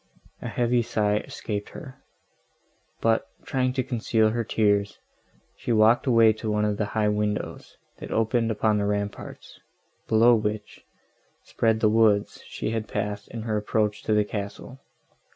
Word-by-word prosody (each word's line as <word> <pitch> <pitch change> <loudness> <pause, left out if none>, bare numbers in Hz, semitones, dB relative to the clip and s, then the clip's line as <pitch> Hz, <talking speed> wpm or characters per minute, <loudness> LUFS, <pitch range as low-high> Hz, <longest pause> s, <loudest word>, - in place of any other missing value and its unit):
A - - -5
heavy 120 0 +1
sigh 105 -2 0
escaped 105 -1 -5
her: 135 -6 -11 1.0
but, 115 0 +2 0.2
trying 130 -1 0
to 130 -1 0
conceal 110 -2 +1
her 115 +1 -1
tears, 105 -2 +1 0.6
she - - -4
walked 110 +3 +4
away 115 -3 +5
to 110 +1 -5
one 105 0 +1
of 105 -1 -1
the 105 - 0
high 105 -1 +3
windows, 105 0 -3 0.2
that - - -8
opened 115 +1 +1
upon 110 -1 +1
the 100 - 0
ramparts, 100 0 -5 0.5
below 115 +2 +5
which, 105 -1 -2 0.6
spread 110 -1 0
the 110 - +4
woods 105 -2 +2
she - - -4
had 110 -1 -3
passed 105 0 -4
in 115 -1 -7
her 110 -2 -1
approach 105 0 -1
to 110 - 0
the 105 0 +3
castle. 105 +5 -6
110 Hz, 150 wpm, -25 LUFS, 105-115 Hz, 1.0 s, away